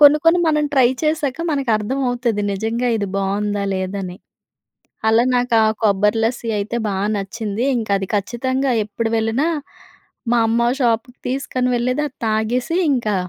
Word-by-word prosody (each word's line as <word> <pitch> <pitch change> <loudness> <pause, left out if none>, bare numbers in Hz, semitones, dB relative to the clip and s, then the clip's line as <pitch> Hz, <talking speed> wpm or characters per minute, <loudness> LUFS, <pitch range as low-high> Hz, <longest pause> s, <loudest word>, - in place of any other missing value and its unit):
కొన్ని 295 +1 +8
కొన్ని 345 +2 +5
మనం 300 -1 +2
ట్రై 255 -3 +5 0.2
చేశాక 305 -3 0
మనకర్థమవుతాది. 245 -2 0
నిజంగా 230 +4 -1
ఇది 200 -2 -2
బాగుందా 200 +1 -1
లేదా 190 +1 -3
అని. 180 +2 -8 0.9
అలా 225 +2 +4
నాకు 245 -1 +1
ఆ - - +4 0.2
కొబ్బరి 210 +1 +3
లస్సి 230 0 -2
అయితే 205 +3 -3
బా 200 - -1 0.2
నచ్చింది. 205 +2 -3
ఇంకా 220 -3 -3
అది 195 - -5
ఖచ్చితంగా 260 +6 -1
ఎప్పుడు 225 +2 -3
వెళ్ళినా, 225 +8 +1 0.8
మా 240 - +4
అమ్మ 235 +1 +2
ఆ - - +1
షాప్‌కి 235 +1 0
తీసుకొని 255 -1 -1
వెళ్ళేది. 250 +4 0
అది 265 - -16
తాగేసి 240 +9 0
ఇంకా, 220 -6 0
235 Hz, 150 wpm, -20 LUFS, 210-255 Hz, 0.9 s, కొన్ని